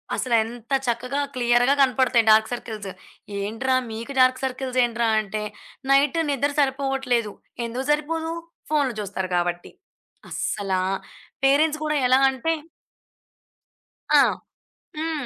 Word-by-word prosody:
అసలు 245 -2 0
ఎంత 235 +3 -7
చక్కగా 250 +4 -1 0.2
క్లియర్‌గా 245 +2 +3
కనపడతాయి 255 -3 +3
డార్క్ 220 0 +5
సర్కిల్స్. 220 -4 -6 0.5
"ఏంట్రా! 225 +6 -1 0.2
మీకు 230 +5 -6
డార్క్ 255 0 +4
సర్కిల్స్ 255 0 -2
ఏంట్రా!" 235 -1 -1
అంటే 215 +1 -4 0.5
"నైట్ 280 +3 +4
నిద్ర 280 +1 0
సరిపోవట్లేదు." 270 -5 0 0.3
ఎందుకు 245 +3 -4
సరిపోదు, 320 +2 -1 0.4
ఫోనులు 285 -6 +1
జూస్తారు 195 -2 -4
కాబట్టి. 175 0 -2 0.6
అస్సలా 190 -2 -1 0.6
పేరెంట్స్ 300 +3 +3
కూడా 305 0 0
ఎలా 255 +1 +5
అంటే 265 +5 -2 1.6
ఆ! - - +7 0.8
హ్మ్. 315 -3 -2
255 Hz, 110 wpm, -23 LUFS, 225-275 Hz, 1.6 s, ఆ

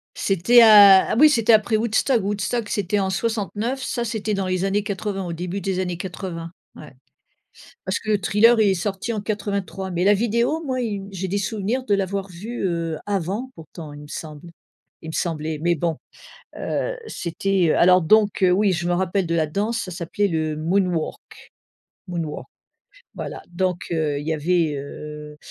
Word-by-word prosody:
C'était 195 +6 +4
à, 205 -4 +8
ah - - +1
oui, 305 +1 +8
c'était 230 -5 +3
après 220 +1 +3
Woodstock. 230 +2 +1
Woodstock, 210 +3 -2
c'était 205 0 0
en 190 -1 0
69, 225 +4 -2
ça, 240 -2 -2
c'était 215 -2 -2
dans 195 -2 -1
les 185 +1 0
années 200 +1 0
80, 200 -1 -3
au 170 - -4
début 180 +4 -4
des 190 0 -2
années 180 -2 -2
80. 170 -2 -6 0.2
Ouais. 150 - -12 0.9
Parce 190 +2 -1
que 215 - -5
le 210 - +3
Thriller 230 +4 +4
il 205 -2 +4
est - - +2
sorti 195 +5 -3
en 215 - -2
83, 200 -2 -3
mais 175 +1 -1
la 205 - +5
vidéo 235 +9 0
moi, 260 -3 -2
il 220 -4 -2
m 195 0 -8
j'ai 190 0 -4
des 200 - -1
souvenirs 215 +5 -2
de 205 - +1
l'avoir 195 0 -2
vue, 200 +6 -6
heu, 165 -3 -2
avant 205 +6 -2
pourtant, 160 -1 -10
il 145 - -10
me 150 - -11
semble, 155 +2 -8 0.5
il 160 - -8
me - - -8
semblait, 160 -2 -2
mais 175 0 +2
bon. 165 0 -1 0.6
Heu, - - -2
c'était 175 0 0
alors 180 +1 +5
donc, 210 +4 +3
heu, 180 - +5
oui, 195 0 +3
je 175 +1 -2
me 175 - +1
rappelle 190 +1 0
de 170 - 0
la 160 -2 +2
danse, 210 +8 -2
ça 185 - -7
s'appelait 175 +4 -1
le 160 -3 -1
Moonwalk 175 0 0 0.9
Moonwalk. 165 -4 -4 0.7
Voilà - - -6
donc, 180 0 -2
heu, 155 -3 0
il 150 - -8
y 160 - +1
avait, 160 0 +1
heu 150 +1 -8
190 Hz, 185 wpm, -22 LUFS, 170-210 Hz, 0.9 s, à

